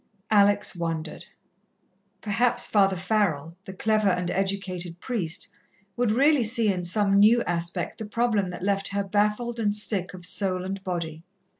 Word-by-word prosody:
Alex 205 -1 +4
wondered. 165 -2 -4 1.0
Perhaps 230 +4 +2
Father 195 -2 +3
Farrell, 175 -5 -1
the 190 - -8
clever 215 +1 +1
and 180 -1 -1
educated 185 -3 -3
priest, 190 -10 -1 0.5
would 245 -2 0
really 275 +3 +3
see 225 -2 +2
in 180 -1 -4
some 200 +2 +2
new 230 +4 +5
aspect 170 +4 -3
the 220 - -5
problem 220 -4 0
that 180 0 -7
left 195 0 0
her 200 +1 -1
baffled 210 +4 0
and 205 -2 0
sick 200 -4 -3
of 180 -1 -3
soul 185 -1 -1
and 195 0 -5
body. 170 -4 -4
200 Hz, 150 wpm, -25 LUFS, 180-215 Hz, 1.0 s, new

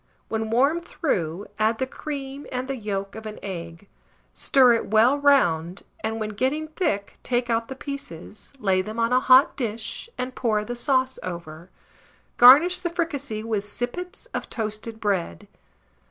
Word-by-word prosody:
When 220 0 -2
warm 275 +8 +3
through, 195 - -2
add 220 +1 +2
the 260 - 0
cream 275 0 -6
and 255 0 -3
the 270 - -2
yolk 200 -4 -4
of 220 0 -8
an 215 - -7
egg; 170 -1 -7 0.5
stir 255 -3 +5
it 230 - -1
well 220 +5 +5
round, 180 - +2 0.2
and, 220 0 -3
when 215 -1 -2
getting 265 +9 -1
thick, 255 - -2
take 240 -1 -1
out 230 0 0
the 265 - -7
pieces, 265 - -8
lay 190 -6 +2
them 215 +4 -7
on 230 +1 +1
a 255 - +5
hot 255 +1 +6
dish, 230 - -4
and 255 +1 -3
pour 215 -4 0
the 245 - -4
sauce 260 +1 +1
over. 170 -1 -7 0.7
Garnish 300 +9 +8
the 355 -1 -2
fricassée 285 -10 -3
with 220 -3 -1
sippets 310 - -5
of - - -4
toasted 220 0 -4
bread. 190 - -2
230 Hz, 160 wpm, -24 LUFS, 205-270 Hz, 0.7 s, Garnish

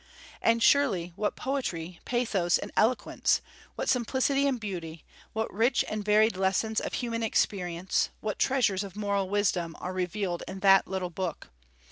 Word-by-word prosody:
And 230 0 +3
surely 180 -12 +3
what 210 +1 -1
poetry, 185 -11 -3
pathos, 215 -8 +1
and - - -7
eloquence, 240 +4 +2 0.4
what - - -3
simplicity 265 +3 +2
and 260 -3 0
beauty, 170 -6 -6 0.3
what 220 0 -3
rich 235 +6 +2
and 215 -1 -3
varied 215 +1 +4
lessons 195 +4 +1
of - - -5
human 230 -2 -2
experience, 185 -5 0
what 215 -1 -4
treasures 225 -8 +2
of 195 -1 -9
moral 200 -2 -1
wisdom, 180 -5 0
are 180 - -4
revealed 185 -1 -2
in 190 0 -7
that 195 0 +6
little 185 -2 -3
book! 175 -2 -4
200 Hz, 150 wpm, -28 LUFS, 185-230 Hz, 0.4 s, that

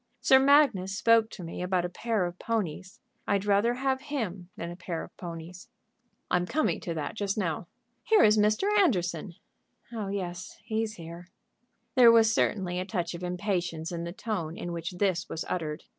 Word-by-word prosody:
Sir 265 - +6
Magnus 265 -10 +4
spoke 225 +1 +4
to 185 - -9
me 170 +1 -6
about 180 -1 0
a - - -3
pair 220 0 -1
of 175 +1 -6
ponies. 190 -5 -3 0.3
I'd 200 0 +1
rather 205 +4 +3
have 265 0 0
him 215 - -4
than 170 0 -5
a - - -7
pair 170 -2 -5
of - - -13
ponies." 175 +4 -8 0.6
"I'm 180 0 +2
coming 310 +9 0
to 170 -4 -4
that 150 -2 -3
just 205 -2 -2
now. 170 -4 -2 0.3
Here 440 -1 +4
is 210 0 +6
Mr. 215 - +2
Anderson." 175 - +1 0.6
"Oh 215 -3 -3
yes; 180 -2 -5
he's 220 0 -2
here." 170 0 -10 0.7
There 245 -3 +8
was 225 -1 +5
certainly 180 -5 0
a - - -1
touch 180 -4 -2
of 170 - -7
impatience 180 -3 -2
in 170 -1 -4
the 170 - -4
tone 175 -5 -4
in 175 - -5
which 170 +1 -4
this 180 -2 0
was 160 - -4
uttered. 155 -4 -3
185 Hz, 180 wpm, -28 LUFS, 175-220 Hz, 0.7 s, There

